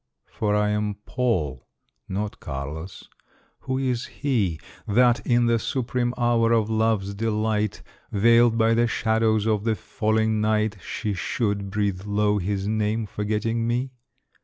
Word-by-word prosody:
For 105 -1 0
I 105 0 +2
am 105 0 -1
Paul 80 - -1 0.4
not 100 +2 -3
Carlos! 75 +6 -6 0.5
Who 130 - -3
is 130 -2 -1
he 105 - -1 0.3
That, 120 +3 +4
in 120 0 +3
the 115 -1 +3
supreme 125 0 -1
hour 120 -1 +2
of 110 -1 +1
love's 110 -3 +1
delight, 110 0 -1 0.3
Veiled 115 +2 +4
by 115 0 +4
the 120 +1 +3
shadows 110 -1 +1
of 105 -2 +1
the 110 -1 +1
falling 110 0 0
night, 110 0 +1
She 105 +4 -3
should 100 +1 -2
breathe 100 -2 -1
low 105 0 +2
his 100 +1 -2
name, 110 +1 0
forgetting 110 +3 -1
me? 125 +3 -1
110 Hz, 135 wpm, -24 LUFS, 105-115 Hz, 0.5 s, That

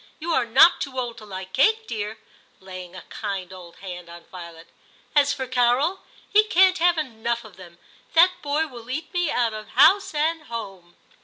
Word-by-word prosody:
You 335 +2 -4
are 250 -5 +1
not 265 +9 +6
too 260 -2 -4
old 240 -1 -5
to 215 - -12
like 190 -1 -8
cake, 440 +10 +3
dear,' 215 - -5 0.4
laying 185 -1 -10
a 185 - -9
kind 195 -3 -5
old 175 -2 -12
hand 180 -3 -9
on 170 0 -12
Violet. 170 -2 -10 0.3
* - - -32
As 285 -1 +4
for 265 - -3
Carol, 255 +8 +1 0.3
he 420 - +5
can't 375 -2 +4
have 345 0 +3
enough 235 -5 -3
of 215 -4 -14
them; 175 -2 -14 0.4
that 355 +3 +5
boy 295 +2 0
will 240 -5 -12
eat 315 +8 -5
me 355 -3 0
out 235 -2 0
of 215 -1 -8
house 360 - +4
and 315 +1 0
home. 195 -8 -8
235 Hz, 190 wpm, -23 LUFS, 190-310 Hz, 0.4 s, not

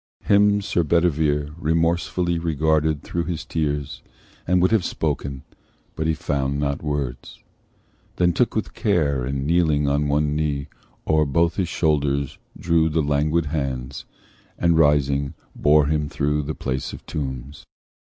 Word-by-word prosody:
Him 105 0 +4
Sir 95 -3 0
Bedivere 75 -3 +1
Remorsefully 85 +2 0
regarded 80 -2 +1
through 85 0 -3
his 85 -2 -4
tears, 75 -3 -2 0.5
And 90 +1 +3
would 90 +3 +3
have 110 -5 +3
spoken, 70 -4 -3 0.5
but 80 - -2
he 80 - +1
found 70 -1 -1
not 70 -1 -1
words; 70 -5 -4 0.7
Then 90 -1 +2
took 120 +7 +1
with 110 - -2
care, 75 - +1
and 70 +2 -2
kneeling 80 -3 +2
on 70 +1 +1
one 75 +1 +1
knee, 75 -2 -1 0.4
O'er 80 -1 +2
both 85 +4 +1
his 90 -4 0
shoulders 70 -4 0 0.2
drew 80 -1 +2
the 80 0 0
languid 75 +3 +1
hands, 70 -3 -4 0.5
And 85 -1 +2
rising 70 -2 +2 0.2
bore 75 0 +4
him 75 0 0
through 75 +1 0
the 80 - -4
place 65 0 -3
of - - -10
tombs. 70 -1 -5
75 Hz, 145 wpm, -23 LUFS, 70-85 Hz, 0.7 s, Him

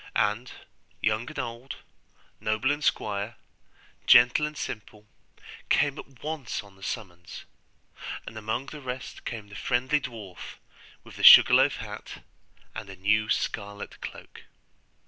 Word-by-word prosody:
And 105 +5 0 0.5
young 110 +3 0
and - - -10
old, 120 +3 -5 0.6
noble 110 +5 +1
and 145 0 -2
squire, 105 0 -1 0.7
gentle 125 +5 +7
and 150 -1 -9
simple, 105 -3 -7 0.6
came 145 -1 +2
at 135 -3 -13
once 150 -8 -4
on 100 -1 -17
the 95 - -21
summons; 90 -6 -7 0.8
and - - -9
among 110 +4 -3
the 150 +1 -9
rest 130 0 -7
came 110 -3 -6
the 105 - -11
friendly 130 +7 +1
dwarf, 110 -8 -8 0.5
with - - -13
the - - -6
sugarloaf - - +9
hat, - - -8 0.5
and 110 -3 -7
a 95 - -8
new 105 +3 +1
scarlet 100 0 -3
cloak. - - -10
110 Hz, 130 wpm, -27 LUFS, 105-130 Hz, 0.8 s, sugarloaf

